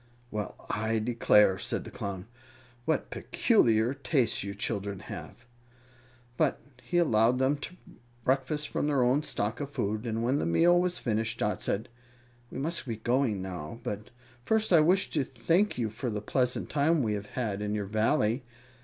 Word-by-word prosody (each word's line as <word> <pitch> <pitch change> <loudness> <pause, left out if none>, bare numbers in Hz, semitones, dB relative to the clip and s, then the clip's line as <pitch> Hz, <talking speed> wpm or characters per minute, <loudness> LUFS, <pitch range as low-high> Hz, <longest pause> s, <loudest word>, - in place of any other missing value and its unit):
"Well, 105 -1 -4
I 110 +1 0
declare!" 105 -4 +4
said - - -2
the - - -10
Clown. 100 -6 -5 0.6
"What - - 0
peculiar 115 +2 +2
tastes 135 - 0
you 100 0 -5
children 100 -2 -3
have!" 120 - -9 0.9
But 155 -4 +2 0.2
he 175 - -2
allowed 120 -7 +4
them 130 +3 +2
to 170 +5 -8 0.5
breakfast 135 +4 0
from - - -1
their 140 -4 +3
own 130 +4 +3
stock 110 -6 -2
of 145 -1 -4
food, 110 -3 -2
and 115 0 -1
when 130 +4 +2
the - - -1
meal 175 - +5
was 180 0 -1
finished 110 0 -1
Dot 105 -4 -1
said, 110 +5 -1 0.6
"We - - -7
must 150 +1 -2
be 115 - -2
going 120 -3 0
now; 90 +2 -6
but 105 +1 -5 0.3
first 220 - +1
I 165 - +8
wish 180 +5 +3
to 150 - +1
thank 165 - +1
you 115 -3 -1
for 120 +3 -4
the 105 -2 -2
pleasant 125 +4 -1
time 150 +1 +2
we 110 -2 0
have 100 0 -4
had 105 -5 -1
in 105 0 -1
your 105 -1 -2
Valley. 110 +3 +1
120 Hz, 170 wpm, -29 LUFS, 105-140 Hz, 0.9 s, I